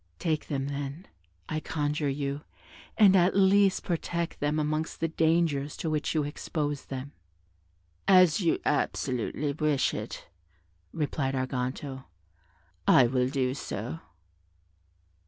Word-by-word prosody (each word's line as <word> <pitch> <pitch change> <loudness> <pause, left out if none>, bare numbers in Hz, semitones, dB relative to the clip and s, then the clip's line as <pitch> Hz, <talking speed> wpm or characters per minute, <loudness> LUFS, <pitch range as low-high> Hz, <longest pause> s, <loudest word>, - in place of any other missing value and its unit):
Take 160 -3 -1
them, 135 -2 -2
then, 145 +5 -5 0.4
I 155 - -2
conjure 150 -1 -1
you, 140 +1 -2 0.6
and 200 -3 +7
at 180 0 +4
least 195 0 +4
protect 170 -1 -2
them 145 +1 0
amongst 155 +1 -1
the 165 - +1
dangers 160 -3 +1
to 160 - -2
which 155 +1 -1
you 155 - +2
expose 145 0 -3
them." 135 +1 -6 1.0
"As 185 -3 +6
you 170 - +2
absolutely 140 0 -1
wish 150 -2 +1
it," - - -6 0.6
replied 140 -3 -1
Arganto, 130 +1 -3 0.8
"I 130 - +7
will 125 +1 +1
do 130 -2 0
so." 125 +2 -5
150 Hz, 120 wpm, -28 LUFS, 135-165 Hz, 1.0 s, and